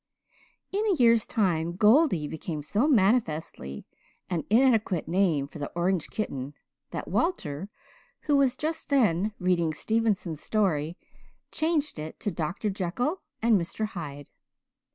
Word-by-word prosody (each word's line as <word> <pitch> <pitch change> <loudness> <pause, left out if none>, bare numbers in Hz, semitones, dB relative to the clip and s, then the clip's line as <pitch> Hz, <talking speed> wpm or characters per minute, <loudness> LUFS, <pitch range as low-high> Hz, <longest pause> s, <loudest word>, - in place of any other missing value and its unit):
In 405 +2 0
a 395 - +3
year's 230 -5 +4
time 170 -7 0
"Goldie" 210 - +4
became 155 0 -5
so 210 - +1
manifestly 190 - +1 0.5
an 165 -4 0
inadequate 220 - +3
name 170 -5 +2
for 150 +2 -11
the 145 - -4
orange 175 -1 0
kitten 140 -9 -4 0.3
that - - -5
Walter, 195 - -1 0.5
who 295 - +1
was 265 -2 +3
just 320 +1 -3
then 210 - +2
reading 170 -4 +1
Stevenson's 210 -7 0
story, 175 -7 0 0.5
changed 310 - 0
it 155 +1 -7
to 205 - -1
Dr. 170 +6 -2
Jekyll 205 - -2 0.2
and 225 -5 +4
Mr. 215 +5 -3
Hyde. 145 -7 -7
195 Hz, 130 wpm, -27 LUFS, 160-235 Hz, 0.5 s, year's